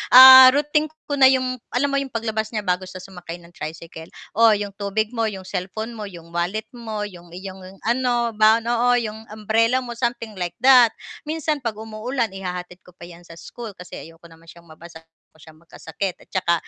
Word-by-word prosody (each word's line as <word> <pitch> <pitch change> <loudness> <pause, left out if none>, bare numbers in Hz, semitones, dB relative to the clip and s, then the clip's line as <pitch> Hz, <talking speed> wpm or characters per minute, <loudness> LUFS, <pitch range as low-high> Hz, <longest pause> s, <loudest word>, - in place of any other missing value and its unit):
ah, 260 0 +12
routine 300 +1 +1 0.2
ko 290 - -4
na 265 - +8
'yong 255 -1 0
alam 280 +3 0
mo 275 - +1
'yong 275 - -6
paglabas 220 -2 -3
niya 215 - -2
bago 180 0 -1
siya 185 0 -10
sumakay 180 -3 -9
ng 170 - -17
tricycle, 160 +1 -9 0.3
o 225 -2 +6
'yong 205 0 -5
tubig 210 +2 -2
mo, 230 -2 0
'yong 190 -2 -8
cellphone 195 +5 -5
mo, 215 -2 -7
'yong 170 -2 -13
wallet 180 +5 -2
mo, 220 -3 -5
'yong 175 -3 -12
iyong 190 +1 -8 0.3
ano, 240 0 0
baon, 220 +1 +4
oo, 240 +1 +2
'yong 220 -1 -5
umbrella 225 +4 +1
mo, 240 - -7
something 235 -1 -3
like 175 -1 -4
that. 250 -4 +7 0.3
Minsan 310 -1 -2
'pag 230 -4 -3
umuulan 225 +2 -3
ihahatid 180 -1 -7
ko 180 - -18
pa - - -14
'yan 175 0 -13
sa 165 - -12
school 220 +4 -10
kasi 180 - -9
ayoko 165 +1 -15
naman 165 0 -19
siyang 170 +1 -15
mabasa, 160 0 -14
ayaw 165 0 -46 0.2
ko - - -23
siyang 155 0 -17
magkasakit 170 +3 -6
at - - -28
saka 185 -3 +1
215 Hz, 200 wpm, -22 LUFS, 180-240 Hz, 0.3 s, ah